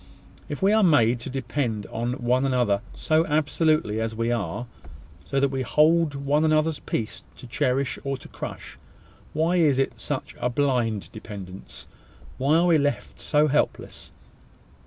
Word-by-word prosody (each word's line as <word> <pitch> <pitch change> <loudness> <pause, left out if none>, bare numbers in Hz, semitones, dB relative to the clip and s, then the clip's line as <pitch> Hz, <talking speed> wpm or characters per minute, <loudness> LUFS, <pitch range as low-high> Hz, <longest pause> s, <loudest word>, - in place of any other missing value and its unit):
If 145 +4 -5
we 200 +2 +5
are 220 - +4
made 125 - +4
to 120 - -6
depend 125 -5 -2
on 120 +2 -2
one 125 0 +1
another 125 -7 +1
so 155 +1 +2
absolutely 150 -6 +1
as 115 0 -2
we 115 +1 0
are, 115 0 -2 0.6
so 135 - -1
that 140 0 +2
we 135 -1 -2
hold 155 +3 +3
one 140 +2 +1
another's 155 0 +2
peace 110 - -4 0.2
to - - -11
cherish 130 +2 -1
or 135 -1 -2
to - - -12
crush, - - -8 0.5
why 165 +4 +1
is 150 -6 +4
it 135 - -1
such - - -4
a 125 - 0
blind 120 -6 0
dependence? 100 -3 -9 0.5
Why 140 +4 +3
are 170 +2 +4
we 170 -3 +4
left 145 0 -2
so 150 0 +3
helpless? 150 +1 -1
135 Hz, 155 wpm, -25 LUFS, 120-155 Hz, 0.6 s, we